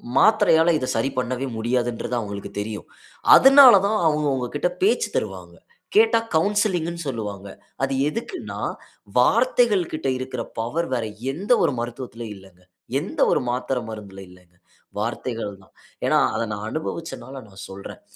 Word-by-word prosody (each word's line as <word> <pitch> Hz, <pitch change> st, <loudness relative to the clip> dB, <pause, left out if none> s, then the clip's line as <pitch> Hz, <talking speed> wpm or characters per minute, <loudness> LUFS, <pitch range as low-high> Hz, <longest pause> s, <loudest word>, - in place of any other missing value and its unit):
மாத்திரையால 175 Hz, -7 st, +5 dB
இதை 130 Hz, -3 st, -3 dB
சரி 115 Hz, +5 st, 0 dB
பண்ணவே 130 Hz, +1 st, -2 dB
முடியாதுன்றது 120 Hz, +1 st, -1 dB
அவுங்களுக்கு 100 Hz, -2 st, -6 dB
தெரியும். 105 Hz, 0 st, -5 dB, 0.5 s
அதுனால 270 Hz, -2 st, +9 dB
தான் 215 Hz, +1 st, +1 dB
அவுங்க 150 Hz, -1 st, +2 dB
உங்க 125 Hz, -1 st, -2 dB
கிட்ட 145 Hz, +4 st, 0 dB
பேச்சு 455 Hz, +4 st, +2 dB
தருவாங்க. -, -, -4 dB, 0.4 s
கேட்டா 445 Hz, -, +5 dB, 0.2 s
கவுன்சிலிங்ன்னு 175 Hz, -2 st, +1 dB
சொல்வாங்க. 105 Hz, -5 st, -5 dB, 0.4 s
அது 135 Hz, 0 st, 0 dB
எதுக்குன்னா, 235 Hz, -, -6 dB, 0.6 s
வார்த்தைகள் 240 Hz, -, +3 dB
கிட்ட 155 Hz, -3 st, -3 dB
இருக்குற 130 Hz, -2 st, -4 dB, 0.2 s
பவர் 155 Hz, +9 st, -2 dB
வேற 120 Hz, -3 st, -1 dB, 0.3 s
எந்த 195 Hz, -, -4 dB
ஒரு 145 Hz, -, +2 dB
மருத்துவத்திலயும் 120 Hz, -2 st, -6 dB
இல்லங்க. 95 Hz, -2 st, -18 dB, 0.4 s
எந்த 185 Hz, -, -7 dB
ஒரு -, -, +1 dB
மாத்திர, 125 Hz, +1 st, -1 dB
மருந்தில 100 Hz, -3 st, -9 dB
இல்லங்க. 90 Hz, -1 st, -20 dB, 0.4 s
வார்த்தைகள் 115 Hz, -1 st, -3 dB
தான். -, -, -25 dB, 0.3 s
ஏன்னா, -, -, +3 dB, 0.2 s
அத -, -, -1 dB
நான் 105 Hz, +1 st, -5 dB
அனுபவிச்சனால 135 Hz, -5 st, -6 dB
நான் 95 Hz, -1 st, -10 dB
சொல்றேன். 95 Hz, 0 st, -9 dB
130 Hz, 135 wpm, -23 LUFS, 110-170 Hz, 0.6 s, அதுனால